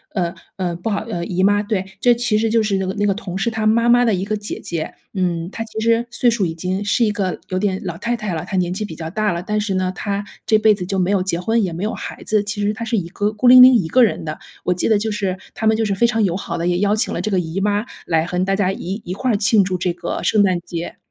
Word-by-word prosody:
呃， 175 -3 0 0.2
呃， 180 -3 -2
不 175 +6 -4
好 200 -2 -1
呃， 215 -6 -4
姨 185 +1 -1
妈， 205 +1 +4
对， 205 -3 -2
这 245 -1 +4
其 235 -3 +1
实 225 0 +1
就 225 0 +2
是 205 -2 0
那 190 - -1
个 185 - -2
那 205 -1 0
个 200 - +2
同 190 -3 -6
事 230 +4 0
他 220 -1 -1
妈 230 +2 +3
妈 245 +1 +6
的 230 -3 +2
一 185 +1 -2
个 215 +1 -1
姐 205 0 -5
姐。 165 -2 -4 0.2
嗯， 175 -3 -1
她 225 - -6
其 220 -1 -12
实 230 +1 +2
岁 245 +1 +2
数 220 -4 0
已 160 - -5
经 185 +4 -2
是 205 +4 +2
一 210 - +1
个 190 -5 -2
有 185 - -1
点 190 -1 0
老 175 -3 -4
太 235 +5 -1
太 210 -4 -4
了， 160 - -3
她 195 - -4
年 180 -1 0
纪 195 - -3
比 185 - -8
较 160 0 -6
大 215 -1 0
了， 170 +1 -4
但 210 +2 -1
是 205 -2 -2
呢， 185 0 0
她 200 0 -3 0.2
这 215 - +5
辈 215 0 +5
子 195 - -5
就 195 +2 -2
没 185 +1 +1
有 195 - +2
结 185 -2 -1
婚， 225 +5 +1
也 185 - -1
没 170 +4 -4
有 215 - -1
孩 - - -7
子。 215 -1 +1
其 205 +1 -4
实 205 +1 +1
她 220 - -6
是 230 +1 -1
一 175 -4 -2
个 205 +3 -1
孤 220 +4 +1
零 255 0 +10
零 255 +1 +9
一 190 -8 +2
个 255 - +4
人 225 - +1
的， 155 0 -5 0.2
我 180 - +1
记 180 - -1
得 220 - +4
就 215 +1 -2
是 195 -3 -2 0.2
他 220 - -2
们 220 - +4
就 225 - +1
是 200 - 0
非 235 +5 +3
常 225 -2 +1
友 180 -4 +1
好 175 - -4
的， 170 - -2
也 175 0 +1
邀 205 +1 +2
请 220 - 0
了 - - -2
这 210 - -2
个 190 -3 +1
姨 165 +2 -4
妈 205 +2 0 0.2
来 160 -1 +2
和 180 +1 -1
大 195 0 +1
家 195 -2 +1
一 195 +2 -5
一 180 - -5
块 250 +5 -1
儿 205 - +2
庆 205 0 +4
祝 185 0 -1
这 180 0 0
个 175 - -4
圣 215 - +3
诞 185 -3 +2
节。 170 0 -6
200 Hz, 335 characters per minute, -20 LUFS, 180-220 Hz, 0.2 s, 零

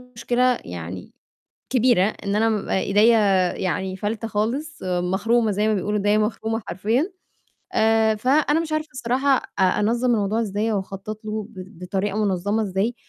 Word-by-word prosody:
مشكلة 245 +1 +1
يعني 90 +1 -7 0.6
كبيرة 245 -6 +3
إن 205 -1 -3
أنا 225 +1 +3
بابقى 210 -3 -1
إيديّا 220 +3 +4 0.4
يعني 185 +1 -2
فالتة 215 +3 -3
خالص 245 +9 -3
مَخرومة 190 +6 +1
زي 210 +2 0
ما 220 - +2
بيقولوا 210 +1 -1
إيديّا 205 +1 +2
مَخرومة 220 +1 -1
حرفيًا، 225 - 0 0.6
آآ 220 0 +3
فأنا 290 +7 +2
مش 325 -1 -4
عارفة 310 0 -2
الصراحة 260 +2 +1
أ - - -6
أنظّم 230 +6 +2
الموضوع 210 +2 0
إزاي 215 +1 -1
أو 205 - +1
أخطط 195 +3 -8
له 215 -1 -4
ب 190 -3 -11
بطريقة 195 +3 -2
منظّمة 200 +3 0
إزاي 200 +4 -1
215 Hz, 150 wpm, -23 LUFS, 195-235 Hz, 0.6 s, إيديّا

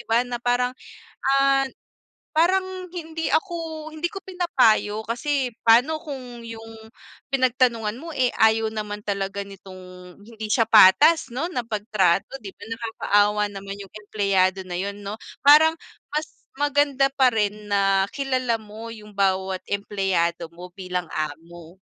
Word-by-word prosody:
ba? 235 +2 +3
Na 240 -1 -5
parang, 245 +1 +1 0.6
ah, 275 0 +3 0.6
parang 370 +3 +1
hindi 325 -1 -4
ako, 320 -2 -2
hindi 315 +2 -3
ko 390 +2 -7
pinapayo 250 - +2
kasi 255 +4 -1 0.2
pano 250 +8 +5
kung 250 -6 -8
yung 225 0 -9 0.6
pinag-tanungan 240 -3 +1
mo, 330 +2 -8
eh, 255 -3 +2
ayaw 220 0 +3
naman 210 -1 -5
talaga 200 -1 -3
nitong, 185 -2 -12
hindi 220 0 -8
siya 220 +2 +2
patas 230 - +6
no 325 +7 -2
na 245 -9 -3
pag-trato 210 +1 0
di 200 -5 -10
ba - - -21
nakakaawa 210 -2 +1
naman 200 0 -7
yung 195 - -13
empleyado 195 -3 0
na 180 -1 -5
yun 200 +2 -3
no? 205 +2 -6 0.2
Parang 310 +3 +7 0.4
mas 305 +1 -2 0.2
maganda 285 -1 +2
pa 260 -3 +3
rin 210 0 -1
na 195 -1 +2
kilala 255 -5 -1
mo 220 +2 -9
yung 210 -1 -13
bawat 190 -2 0
empleyado 190 -4 -1
mo 180 +1 -10
bilang 180 -2 -4
amo. 165 +3 -6
225 Hz, 135 wpm, -23 LUFS, 200-275 Hz, 0.6 s, Parang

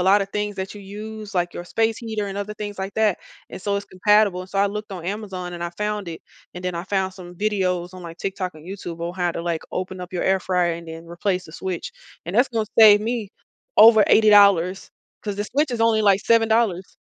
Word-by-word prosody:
lotta 195 +2 +4
things 205 0 -3
that 190 +2 -5
you 205 - -10
use, 210 +1 -8
like 175 -1 0
your 175 - -7
space 225 +2 0
heater 220 -3 -3
and 195 +1 -5
other 210 +1 -4
things 205 -2 -6
like 190 +1 -4
that 215 -4 +2 0.3
and - - -8
so 200 -1 0
it's 200 - -4
compatible, 200 -1 +2
and 185 - -9
so 195 - -2
I 200 - +4
looked 210 +1 -5
on 175 -3 -7
Amazon 190 -3 -5
and 170 0 -6
I 170 - -3
found 210 -3 -2
it. 160 - -8 0.3
And 180 - -8
then 180 -1 -2
I 170 +2 -4
found 190 -1 -1
some 180 -2 -11
videos 185 -3 -1
on 185 -1 -10
like 165 0 -9
TikTok 190 -3 -4
and 155 +2 -14
YouTube 180 -3 -7
on 170 +1 -4
how 180 -2 0
to, 170 - -5
like, 170 -2 -2
open 185 0 -4
up 180 +1 -8
your 180 - -2
air 190 0 +2
fryer 180 -2 +1
and 165 0 -8
then 165 +1 -8
replace 180 +2 -2
the 155 - -13
switch 185 0 -5 0.3
and 175 +4 -6
that's 245 +4 +4
gonna 225 -3 -1
save 210 -2 +9
me 230 -2 -2 0.5
over 220 -1 +8
$80 200 -4 +5 0.3
'cause 205 -2 -4
the 205 - -2
switch 280 +5 0
is 235 -2 -3
only 220 -1 +3
like 200 -1 +4
$7. 225 -5 +2
195 Hz, 235 wpm, -22 LUFS, 180-210 Hz, 0.5 s, save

